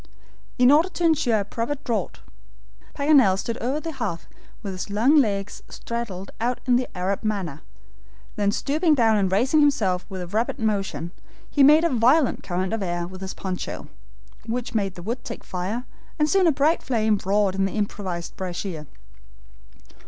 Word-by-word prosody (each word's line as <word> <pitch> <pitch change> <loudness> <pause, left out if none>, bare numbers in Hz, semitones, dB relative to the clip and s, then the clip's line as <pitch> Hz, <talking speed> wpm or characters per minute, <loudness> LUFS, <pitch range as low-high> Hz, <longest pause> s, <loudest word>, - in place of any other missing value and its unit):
In 250 +1 +6
order 315 +5 +5
to 355 - -5
ensure 285 -10 +3
a - - -5
proper 230 +7 -3
draught, 240 -5 -3 0.7
Paganel 280 -10 +4
stood 230 +4 -3
over 265 +5 -1
the 325 +1 -5
hearth 225 - -4 0.4
with 195 -2 -4
his 185 +2 -5
long 230 +9 +3
legs 205 -7 0
straddled 220 -5 -5
out 245 +1 0
in 250 -1 +4
the 250 0 +1
Arab 190 +4 -1
manner. 190 -9 -3 0.7
Then 200 -1 +1
stooping 305 - +1
down 225 -4 +4
and 190 -2 +1
raising 250 +10 +3
himself 215 -12 +2
with 190 -2 -5
a - - -5
rapid 215 +7 -1
motion, 200 -6 -2 0.4
he 285 - 0
made 300 +4 +7
a 340 - +3
violent 255 +4 +3
current 185 +2 -2
of 225 - -2
air 175 -2 -2
with 185 +1 -10
his 190 0 -5
poncho, 185 -2 -5 0.6
which 245 +2 -3
made 200 -4 -1
the 175 - -9
wood 235 +6 -4
take 235 - -7
fire, 195 +7 -4 0.3
and 300 -1 +2
soon 380 +2 +3
a - - +6
bright 300 +4 +2
flame 220 -4 +1
roared 200 0 +2
in 195 0 +1
the 195 - -3
improvised 190 -4 -3
brasier. 175 -4 -5
220 Hz, 175 wpm, -24 LUFS, 190-265 Hz, 0.7 s, made